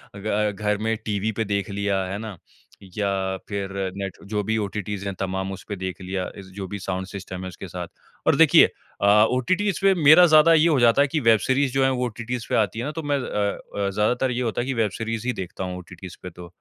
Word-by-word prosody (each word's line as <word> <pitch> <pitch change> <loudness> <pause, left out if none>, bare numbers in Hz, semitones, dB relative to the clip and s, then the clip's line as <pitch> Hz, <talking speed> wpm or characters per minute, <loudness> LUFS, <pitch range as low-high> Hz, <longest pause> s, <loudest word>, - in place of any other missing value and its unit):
ग 105 +1 0
घर 105 -1 +1
में 110 +2 -1
टीवी 105 0 -1
पे 110 +1 -2
देख 100 0 -2
लिया 100 -1 -1
है 95 +2 -4
ना? 105 -4 -7 0.6
या 95 -2 -1
फिर 100 -1 -3 0.3
नेट 95 -2 -5
जो 105 -1 0
भी 110 +2 -1
ओटीटीज़ 105 -1 -4
है 100 - -2
तमाम 95 0 -2
उसपे 100 +2 -6
देख 95 -1 -5
लिया। 95 0 -3
इस 100 - -9
जो 100 -1 -5
भी 100 - -5
साउंड 95 0 -4
सिस्टम 95 -1 -7
है 95 - -5
उसके 95 +1 -9
साथ। 90 -1 -6 0.4
और - - +5
देखिए - - +7 0.4
अ, 100 - +3 0.2
ओटीटीज़ 185 +10 0
पे 195 0 +5
मेरा 155 +5 +9
ज़्यादा 155 0 +6
ये 160 +1 +5
हो 150 -5 +3
जाता 120 +3 +5
है 145 - +4
कि 155 - -1
वेब 115 -5 +4
सीरीज़ 130 +2 +1
जो 135 0 +2
है 135 - +4
वो 125 -1 -1
ओटीटीज़ 120 0 -5
पे - - +1
आती 110 0 +1
है 120 - -3
ना 150 - -3
तो 160 +1 -6
मैं 145 -1 0
अ 100 -3 -3
अ, - - 0
ज़्यादातर 120 +6 +1
ये 125 0 -2
होता 115 -1 -1
है 125 - -4
कि 135 - -1
वेब 110 -4 0
सीरीज़ 115 +1 -3
ही 125 - +1
देखता 95 0 -6
हूँ 90 0 -4
ओटीटीज़ 90 0 -10
पे 90 - -5
तो। 90 0 -11
105 Hz, 240 wpm, -24 LUFS, 95-125 Hz, 0.6 s, मेरा